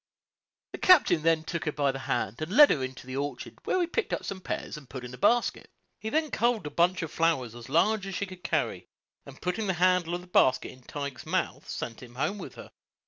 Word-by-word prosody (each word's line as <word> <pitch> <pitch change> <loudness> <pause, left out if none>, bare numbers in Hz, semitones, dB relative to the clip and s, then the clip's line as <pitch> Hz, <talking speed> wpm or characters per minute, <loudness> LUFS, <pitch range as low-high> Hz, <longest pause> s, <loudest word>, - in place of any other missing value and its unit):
The - - -7
captain 265 - +6
then 160 0 +2
took 170 +1 -4
her 150 - 0
by 145 -2 +1
the 135 - -6
hand, 120 -2 -2
and 155 +3 -3
led 290 +6 +8
her 135 - +1
into 130 0 -6
the 130 0 -6
orchard, 145 +1 -5
where 370 - +1
he 355 - +2
picked 390 +4 -2
up - - -2
some 190 -1 -5
pears, - - -4
and 145 -4 -11
put 130 -2 -7
in 125 - -9
a - - -8
basket; 240 - +2 0.3
he 220 - -4
then 310 +3 0
culled 235 -6 +1
a 150 - -4
bunch 175 +1 +2
of 160 - -5
flowers 150 -9 +1
as 120 +1 -11
large 195 +7 +2
as 195 - -5
she 200 - -1
could 185 -2 -12
carry, - - -1 0.4
and - - -12
putting 180 +4 -1
the 190 - +2
handle 180 -1 +2
of 175 - -5
the - - -13
basket 155 -7 +3
in 130 - -16
Tige's 140 0 -6
mouth, - - -2
sent 115 -2 -5
him 120 -1 -12
home 195 +10 -1
with - - -8
her. - - -11
165 Hz, 245 wpm, -28 LUFS, 135-195 Hz, 0.4 s, led